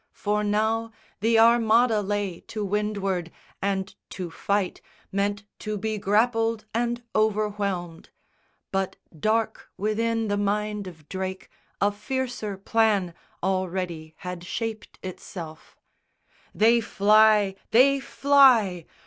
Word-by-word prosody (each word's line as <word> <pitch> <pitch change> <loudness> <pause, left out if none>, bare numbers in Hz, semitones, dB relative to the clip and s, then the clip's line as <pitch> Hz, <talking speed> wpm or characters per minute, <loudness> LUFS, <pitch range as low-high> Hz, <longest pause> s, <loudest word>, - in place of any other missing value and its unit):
For 210 0 -1
now 220 +2 0 0.3
The 225 +2 +3
Armada 230 0 +5
lay 200 -3 -2
to 215 -2 -4
windward, 195 -4 -1 0.3
and 195 0 -1 0.2
to 180 -3 -6
fight 200 +2 -1 0.3
Meant 200 +1 -1 0.2
to 215 0 -3
be 215 +1 -2
grappled 225 +2 +1
and 240 +1 -1
overwhelmed; 205 -5 -1 0.6
but 195 -1 -1 0.2
dark 220 +5 0
Within 225 +2 0
the 205 0 0
mind 210 0 -1
of 160 -4 -12
Drake, 190 0 -5 0.3
a 205 +1 +3
fiercer 220 -1 -4
plan 200 -3 +1 0.3
Already 180 -4 -2
had 180 -1 -6
shaped 220 +3 -5
itself. 170 -3 -9 0.8
"They 230 +2 +5
fly! 210 -1 +4 0.2
They 275 +4 +5
fly!" 255 - +4
210 Hz, 105 wpm, -25 LUFS, 190-225 Hz, 0.8 s, Armada